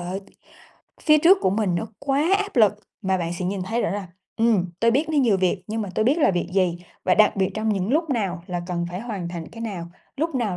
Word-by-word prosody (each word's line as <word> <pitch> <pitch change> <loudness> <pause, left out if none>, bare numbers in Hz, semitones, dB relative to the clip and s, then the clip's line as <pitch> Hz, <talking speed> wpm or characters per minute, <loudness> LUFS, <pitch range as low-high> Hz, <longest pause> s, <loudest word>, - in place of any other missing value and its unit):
ơi, 180 +3 -4 0.8
phía 305 -1 +5
trước 360 +5 +6
của - - +2
mình 200 -3 0
nó 220 - -2
quá 290 +7 +1
áp 405 -7 -4
lực, 215 -4 +6 0.3
mà 190 -1 +1
bạn 170 0 -2
sẽ 180 +1 -4
nhìn 190 +1 -2
thấy 230 +5 -1
rõ - - 0
là, 200 -1 -3 0.3
ừm, 220 -6 +2
tôi 230 0 +4
biết 290 +6 +1
nó 310 - 0
nhiều 230 -7 +4
việc, 185 0 0
nhưng 220 +1 -2
mà 200 - -5
tôi 215 - +1
biết 285 +7 +3
là 295 - +4
việc 175 -1 -2
gì 180 -3 +1 0.3
và 185 - +4
đặc 215 -1 +4
biệt 190 -1 +1
trong 220 0 -1
những 195 -2 0
lúc 315 +1 +1
nào 190 -8 -1
là 175 -1 -3
cần 175 -1 -2
phải 180 - -5
hoàn 205 -7 -5
thành 170 -2 -6
cái 230 - -10
nào, 195 -7 -4 0.3
lúc 320 +1 -1
nào 215 -8 -1
205 Hz, 255 wpm, -23 LUFS, 180-240 Hz, 0.8 s, trước